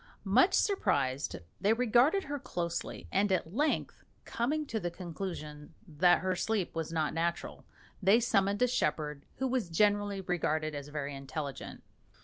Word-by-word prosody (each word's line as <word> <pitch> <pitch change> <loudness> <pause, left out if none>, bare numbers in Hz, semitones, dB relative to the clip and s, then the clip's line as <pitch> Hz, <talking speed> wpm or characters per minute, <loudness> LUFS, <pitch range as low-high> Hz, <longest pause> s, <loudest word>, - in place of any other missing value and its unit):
Much 245 - +4
surprised, 140 - +1 0.2
they 205 +2 +3
regarded 250 - +3
her 290 0 -4
closely, 175 -10 -4
and 200 +1 +2
at 180 -2 0
length 300 +7 -1 0.2
coming 295 +7 -1
to 225 -5 -3
the 175 - -2
conclusion 170 -4 -7
that 175 +2 +4
her 185 0 0
sleep 205 -1 -1
was 165 0 -3
not 155 -3 0
natural, 170 +1 -2 0.4
they 200 +4 +5
summoned 200 -2 +2
a - - +5
shepherd 150 - -1
who 265 - -1
was 250 -7 -1
generally 205 +2 +2
regarded 155 -4 -1
as 145 -1 -6
very 145 -1 -4
intelligent. 140 +1 -6
185 Hz, 145 wpm, -31 LUFS, 155-225 Hz, 0.4 s, they